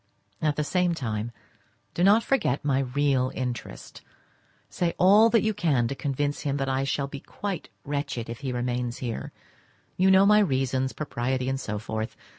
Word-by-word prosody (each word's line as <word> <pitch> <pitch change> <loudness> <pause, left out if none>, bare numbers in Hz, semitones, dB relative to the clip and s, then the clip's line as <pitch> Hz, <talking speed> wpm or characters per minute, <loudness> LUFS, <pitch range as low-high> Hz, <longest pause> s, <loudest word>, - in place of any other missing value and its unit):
At 150 -2 +1
the 150 - 0
same 180 +2 +1
time, 115 -5 -3 0.6
do 175 - 0
not 210 +4 +6
forget 150 - 0
my 135 -2 +2
real 135 -1 +1
interest; 125 -3 -5 0.7
say 170 -1 -1
all 205 +5 +6
that 230 -1 +3
you 220 0 +1
can 150 - +1
to - - -2
convince 145 +1 -2
him 140 -1 -1
that 135 -1 -1
I 135 0 0
shall 140 +1 -1
be 140 0 -7
quite 200 +4 -5 0.2
wretched 140 -5 -3
if 115 0 -6
he 135 -2 -3
remains 125 0 -2
here; 120 -3 -5 0.7
you 185 +1 +4
know 190 +1 +6
my 210 +1 +6
reasons—propriety, 130 - -1
and 135 0 -1
so 105 -5 -4
forth. 110 +1 -4
140 Hz, 170 wpm, -26 LUFS, 125-170 Hz, 0.7 s, not